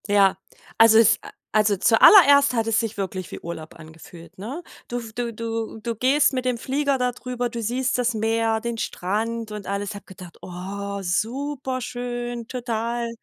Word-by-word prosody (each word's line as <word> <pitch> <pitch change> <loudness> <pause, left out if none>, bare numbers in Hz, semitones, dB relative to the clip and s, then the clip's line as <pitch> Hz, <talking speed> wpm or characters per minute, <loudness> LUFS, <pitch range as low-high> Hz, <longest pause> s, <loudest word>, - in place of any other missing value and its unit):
Ja, 200 -2 +4 0.4
also 225 -1 +7
es 225 -2 +5
a - - -10 0.2
also 210 -1 +3
zuallererst 280 - +7
hat 225 -2 0
es 225 -1 +2
sich 225 -2 -3
wirklich 190 -3 -4
wie - - -8
Urlaub 160 -2 -8
angefühlt, 165 +1 -14
ne? 255 - -6 0.2
Du 245 - -4
f 225 -2 -9
du 235 0 -3
du 225 0 -4
du 235 -1 -2
gehst 270 +6 +3
mit 255 -1 -3
dem 250 -1 0
Flieger 275 +3 0
da 250 -1 0
drüber, 245 0 -4
du 235 0 -5
siehst 250 +4 -1
das 245 -1 +1
Meer, 225 0 0
den 235 0 -3
Strand 220 +3 -3
und 210 -2 -7
alles. 200 +1 -3
Habe 205 - -10
gedacht: 180 -3 -12
„Oh, 200 +3 -6
superschön, 245 +2 -3
total.“ 235 -1 -3
230 Hz, 170 wpm, -23 LUFS, 205-245 Hz, 0.4 s, also